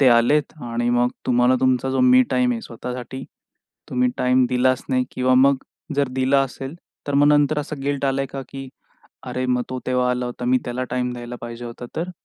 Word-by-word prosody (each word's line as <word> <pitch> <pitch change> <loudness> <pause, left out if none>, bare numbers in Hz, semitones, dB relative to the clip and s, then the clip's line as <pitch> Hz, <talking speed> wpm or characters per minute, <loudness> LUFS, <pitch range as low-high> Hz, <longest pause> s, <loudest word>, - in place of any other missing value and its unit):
ते 135 - +6
आलेत 125 +5 +3
आणि 120 0 -2
मग 120 0 +3 0.2
तुम्हाला 125 0 +4
तुमचा 130 0 +2
जो 130 0 +1
मी 125 0 +6
टाईम 125 -1 +2
आहे, 115 - -3
स्वतःसाठी 125 +2 -7 0.7
तुम्ही 125 0 +2
टाईम 125 0 +3
दिलाच 130 +1 +2
नाही? 130 -1 +1
किंवा 130 0 +2
मग 135 +2 +5 0.4
जर 140 -2 +2
दिला 135 +1 +3
असेल, 135 +2 -6 0.3
तर 145 - -2
मग 145 +1 +5
नंतर 150 0 +3
असं 150 -1 -5
गिल्ट 140 0 -1
आलाय 135 0 +1
आहे - - -3
का, - - -4
की 135 -1 -7 0.6
"अरे, 130 0 -2
मग 125 -1 +1
तो 130 - -3
तेव्हा 125 -1 +1
आला 125 0 -1
होता, 125 0 -6
मी 130 +1 +3
त्याला 125 +1 -3
टाईम 125 0 -1
द्यायला 120 0 -7
पाहिजे 120 0 -7
होता, 120 +1 -8
तर 170 +3 -2
125 Hz, 205 wpm, -22 LUFS, 125-135 Hz, 0.7 s, ते